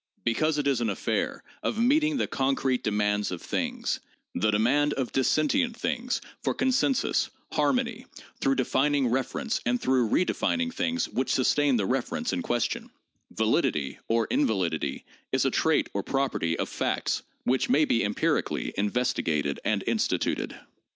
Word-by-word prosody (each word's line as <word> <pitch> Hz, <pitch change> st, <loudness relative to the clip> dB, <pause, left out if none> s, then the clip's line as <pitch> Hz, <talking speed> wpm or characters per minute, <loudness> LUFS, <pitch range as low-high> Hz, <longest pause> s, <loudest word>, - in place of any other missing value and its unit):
Because 150 Hz, +7 st, +1 dB
it 145 Hz, -, 0 dB
is 135 Hz, -4 st, +2 dB
an 115 Hz, -, +1 dB
affair 100 Hz, -, -2 dB, 0.2 s
of -, -, -2 dB
meeting 295 Hz, +5 st, +3 dB
the -, -, +1 dB
concrete 135 Hz, -1 st, 0 dB
demands 105 Hz, -1 st, +1 dB
of 90 Hz, -, -4 dB
things, -, -, -2 dB, 0.3 s
the 110 Hz, -, +1 dB
demand 130 Hz, +8 st, +3 dB
of 130 Hz, -3 st, -2 dB
dis 130 Hz, -, +1 dB
sentient 265 Hz, -5 st, +1 dB
things 250 Hz, +1 st, -1 dB, 0.2 s
for -, -, -1 dB
consensus, 260 Hz, 0 st, +1 dB, 0.2 s
harmony, 250 Hz, -2 st, 0 dB, 0.3 s
through 135 Hz, 0 st, +2 dB
defining 135 Hz, +1 st, +2 dB
reference 130 Hz, -, -1 dB
and 245 Hz, 0 st, +1 dB
through 130 Hz, -, +2 dB
redefining 250 Hz, -, +1 dB
things 255 Hz, 0 st, 0 dB
which 130 Hz, -, -1 dB
sustain 140 Hz, +1 st, +3 dB
the 105 Hz, -4 st, +1 dB
reference 240 Hz, -, -1 dB
in -, -, -1 dB
ques 120 Hz, -, 0 dB
tion, 120 Hz, -, -3 dB, 0.4 s
validity 70 Hz, -3 st, 0 dB
or 115 Hz, 0 st, +2 dB
invalidity 95 Hz, -, 0 dB, 0.3 s
is -, -, +2 dB
a -, -, +2 dB
trait -, -, +2 dB
or 100 Hz, -, 0 dB
property 130 Hz, -11 st, -1 dB
of -, -, -1 dB
facts -, -, -1 dB, 0.2 s
which 130 Hz, 0 st, +1 dB
may 150 Hz, +2 st, +4 dB
be 115 Hz, -, +2 dB
empirically 105 Hz, +1 st, 0 dB
investigated 85 Hz, -, 0 dB
and -, -, 0 dB
instituted. -, -, -1 dB
135 Hz, 150 wpm, -27 LUFS, -, 0.4 s, may